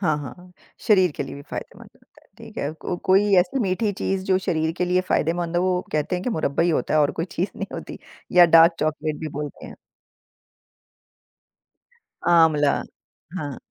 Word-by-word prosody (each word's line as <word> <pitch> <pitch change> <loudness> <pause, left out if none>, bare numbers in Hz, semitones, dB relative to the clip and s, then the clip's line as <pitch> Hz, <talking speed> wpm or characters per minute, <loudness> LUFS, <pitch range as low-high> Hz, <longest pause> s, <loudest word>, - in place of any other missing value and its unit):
हाँ, 155 -6 +1
हाँ, 135 -4 -7
हाँ। 180 0 -17 0.3
शरीर 185 -6 +4
के - - -2
लिए 135 - -8
भी 140 - -10
फायदेमंद - - -8
होता - - -26
है। - - -27
ठीक - - -11
है, 140 - -2
को 160 +2 -5
कोई 195 +2 +4
ऐसी 180 +8 +2
मीठी 205 +1 0
चीज़ 190 0 -3
जो 190 -1 +2
शरीर 160 -4 -1
के 180 - +1
लिए 180 +1 +2
फायदेमंद 170 +1 0
हो 175 - +2
वो 185 -1 +1
कहते 155 +4 -1
हैं 180 - -5
कि 250 - -1
मुरब्बा 160 -5 0
ही 175 - +2
होता 155 - -1
है 155 - +4
और 145 - +3
कोई 165 - -3
चीज़ 185 +3 -2
नहीं - - -4
होती - - -8 0.3
या 180 -1 +8
डार्क 165 +1 +7
चॉकलेट 155 0 -2
भी 160 - -4
बोलते 150 -1 -7
हैं। - - -10 2.5
आँवला, 160 -4 +4 0.6
हाँ। 145 -5 -5
170 Hz, 195 wpm, -23 LUFS, 155-185 Hz, 2.5 s, या